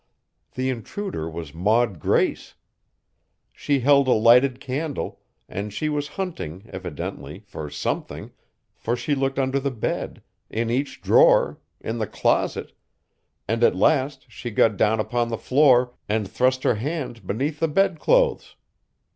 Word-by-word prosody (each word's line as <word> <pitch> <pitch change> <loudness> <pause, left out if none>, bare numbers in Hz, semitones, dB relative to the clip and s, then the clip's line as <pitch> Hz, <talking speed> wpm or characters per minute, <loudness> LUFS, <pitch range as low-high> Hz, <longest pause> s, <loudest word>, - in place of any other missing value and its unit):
The 130 +1 0
intruder 125 - -5
was 80 -2 -7
Maud 105 +2 +1
Grace. - - 0 1.0
She 140 -2 0
held 140 +1 +4
a 125 - +5
lighted 125 +4 +5
candle, 140 +2 -4 0.3
and 100 +3 -5
she 155 +9 -2
was 145 -1 -2
hunting, 95 - -5
evidently, 90 -5 -6
for 75 -1 -7
something, 70 0 -4 0.4
for 120 - -2
she 145 +4 -2
looked 135 -1 -1
under 135 0 +1
the 140 +1 -1
bed, 120 -5 -4 0.3
in 115 +1 -2
each 135 +4 -2
drawer, - - +4 0.2
in - - -4
the - - -1
closet; - - 0 0.8
and - - 0
at 470 - +5
last 140 -3 +1
she 120 0 -7
got 110 -1 +3
down 110 +2 +2
upon 120 +2 0
the 115 - -2
floor 125 -2 +4 0.2
and 105 -1 0
thrust 130 +5 +1
her - - +3
hand 130 - -4
beneath 145 +8 -2
the 165 - +2
bedclothes! 200 - +2
130 Hz, 140 wpm, -23 LUFS, 110-145 Hz, 1.0 s, a